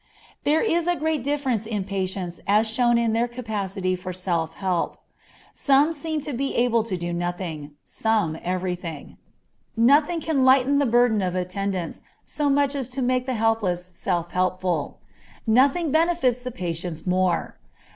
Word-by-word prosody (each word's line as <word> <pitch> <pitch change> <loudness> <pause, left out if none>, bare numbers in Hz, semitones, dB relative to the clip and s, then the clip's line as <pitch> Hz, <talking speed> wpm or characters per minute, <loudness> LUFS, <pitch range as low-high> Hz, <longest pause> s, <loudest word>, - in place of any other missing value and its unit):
There 300 +2 +3
is 345 -5 +1
great 310 -4 -1
difference 265 -6 -1
in 210 -3 -2
patients 190 -2 -3
as 210 +3 +4
shown 240 +1 +3
in 230 -1 +1
their 230 +2 +1
capacity 200 -6 -3
for 185 0 -6
self 170 -3 -2
help. 185 -3 -1 0.6
Some 285 +3 +3
seem 315 0 -3
to 295 0 -5
be 270 +3 -2
able 235 -1 +3
to 195 -5 -2
do 175 0 -4
nothing, 170 -4 -4
some 215 -8 0
everything. 180 -4 -4 0.6
Nothing 290 +8 +4
can 310 -4 0
lighten 265 +2 +5
the 285 - +2
burdens 240 -2 +3
of 180 -1 -1
attendants 185 0 -3 0.2
so 295 -1 -1
much 280 0 +2
as 270 -3 -3
to 265 - 0
make 255 +1 0
the 260 - -1
helpless 215 -6 0
self 175 -1 -3
helpful. 185 -4 -1 0.5
Nothing 270 +8 +3
benefits 315 -7 +2
the 250 - -4
patients 175 -7 -5
more. 180 -1 0
220 Hz, 150 wpm, -24 LUFS, 180-270 Hz, 0.6 s, lighten